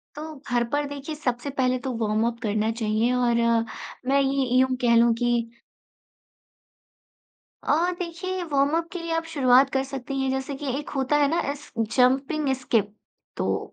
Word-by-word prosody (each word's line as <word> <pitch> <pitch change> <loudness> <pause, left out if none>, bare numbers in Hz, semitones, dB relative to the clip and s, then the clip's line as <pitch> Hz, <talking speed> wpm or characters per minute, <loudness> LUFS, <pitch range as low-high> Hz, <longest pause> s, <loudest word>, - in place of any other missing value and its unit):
तो 310 +1 -7
घर 240 -1 +2
पर 290 0 +1
देखिए, 285 +2 -6
सबसे 250 -2 -2
पहले 255 0 +2
तो 265 - -2
वॉर्मअप 225 +2 0
करना 215 0 0
चाहिए 220 +3 +1
और 245 -1 +2 0.7
मैं 275 +1 +4
ये 270 -1 +1
यूँ 260 0 +3
कह 235 -1 +4
लूँ 235 0 +5
कि 240 0 +2 2.3
अ, 340 +4 +2
देखिए, 360 +2 -4
वॉर्मअप 290 +4 +2
के 360 - -4
लिए 335 0 -3
आप 330 0 -1
शुरुआत 265 -2 +5
कर 265 - +1
सकती 270 0 -5
हैं, 265 0 0
जैसे 265 +1 -3
कि 280 +2 -7
एक 295 - -7
होता 270 +1 0
है 290 -1 +3
ना, 330 +4 +1
एस 290 +1 -8
जंपिंग 260 +6 +2
स्किप। 210 -5 +1 0.4
तो - - -2
270 Hz, 160 wpm, -25 LUFS, 240-295 Hz, 2.3 s, लूँ